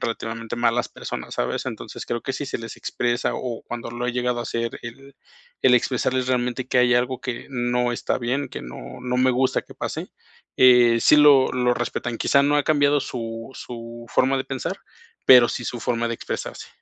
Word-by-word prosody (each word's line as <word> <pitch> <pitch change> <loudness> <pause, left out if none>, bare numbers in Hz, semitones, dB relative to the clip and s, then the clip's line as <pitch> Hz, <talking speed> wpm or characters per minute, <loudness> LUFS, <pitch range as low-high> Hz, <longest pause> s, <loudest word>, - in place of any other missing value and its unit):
relativamente 115 0 -4
malas 120 0 +1
personas, - - -7
¿sabes? - - -2
Entonces, - - -6
creo 120 - -2
que 135 - -3
si 145 - -4
se - - -3
les 115 0 -8
expresa, 120 0 -1
o 120 -3 -4
cuando 120 -1 -6
lo 120 +1 -4
he 125 - -1
llegado 125 0 -1
a - - -2
hacer 115 0 -3
el 135 +4 -10 0.5
el 125 -1 +6
expresarles 125 +1 +1
realmente 125 0 -1
que 125 - +2
hay 125 -1 +4
algo 125 +1 0
que 125 +1 -5
no 120 -1 0
está - - -1
bien, 130 +3 -2
que - - -7
no 60 0 -9
no 125 0 -1
me 130 0 +4
gusta 130 +1 +1
que - - -15
pase, - - -5 0.5
eh, 120 -2 +6
sí 150 - +6
lo 145 -3 +6
lo 125 -1 +2
respetan. 120 -1 -3
Quizá 140 - +3
no 145 +1 +2
ha 145 - +3
cambiado 145 -1 +3
su 115 -2 -6
su 115 0 -9
forma 135 +4 +2
de 130 - -2
pensar, 135 -2 -4 0.5
pero 125 -2 +8
sí 120 - -4
su 120 0 -4
forma 120 -1 -1
de 115 - -2
expresarse. - - -6
125 Hz, 200 wpm, -23 LUFS, 120-130 Hz, 0.5 s, pero